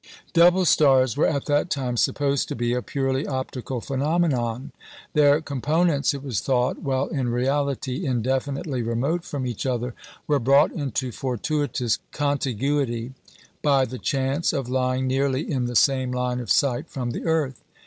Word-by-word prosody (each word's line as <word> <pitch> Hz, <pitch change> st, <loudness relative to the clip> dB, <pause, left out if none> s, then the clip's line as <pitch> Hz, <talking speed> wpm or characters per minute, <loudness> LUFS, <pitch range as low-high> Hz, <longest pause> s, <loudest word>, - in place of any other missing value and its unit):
Double 175 Hz, +2 st, +5 dB
stars 130 Hz, -7 st, +4 dB
were 145 Hz, -, +3 dB
at 140 Hz, -3 st, -1 dB
that 145 Hz, +3 st, +1 dB
time 130 Hz, -5 st, -1 dB
supposed 140 Hz, +3 st, +1 dB
to -, -, -4 dB
be 120 Hz, +1 st, 0 dB
a 125 Hz, -, 0 dB
purely 135 Hz, +1 st, -1 dB
optical 130 Hz, -1 st, -4 dB
phenomenon. 135 Hz, -3 st, -1 dB, 0.4 s
Their 145 Hz, 0 st, +4 dB
components, 150 Hz, +2 st, +1 dB
it 140 Hz, -, -7 dB
was 130 Hz, -8 st, -2 dB
thought, 125 Hz, -2 st, 0 dB
while 135 Hz, 0 st, 0 dB
in 135 Hz, -7 st, -1 dB
reality 135 Hz, +3 st, -1 dB
indefinitely 130 Hz, +2 st, -1 dB
remote 130 Hz, +9 st, -1 dB
from 140 Hz, -6 st, -4 dB
each 120 Hz, -4 st, -4 dB
other, 125 Hz, -1 st, -2 dB, 0.3 s
were 145 Hz, -2 st, +2 dB
brought 135 Hz, +3 st, +4 dB
into 135 Hz, -4 st, -3 dB
fortuitous 130 Hz, 0 st, -1 dB
contiguity 135 Hz, -3 st, -1 dB, 0.5 s
by 140 Hz, -3 st, +3 dB
the 130 Hz, 0 st, -7 dB
chance 135 Hz, +4 st, 0 dB
of 135 Hz, -3 st, -2 dB
lying 130 Hz, 0 st, 0 dB
nearly 135 Hz, +1 st, +1 dB
in 130 Hz, -5 st, -1 dB
the 120 Hz, -, -5 dB
same 130 Hz, 0 st, +3 dB
line 125 Hz, 0 st, -1 dB
of 120 Hz, -, -4 dB
sight 140 Hz, +3 st, +1 dB
from 125 Hz, -3 st, -3 dB
the -, -, -5 dB
earth. 155 Hz, -6 st, 0 dB
135 Hz, 155 wpm, -24 LUFS, 125-145 Hz, 0.5 s, Double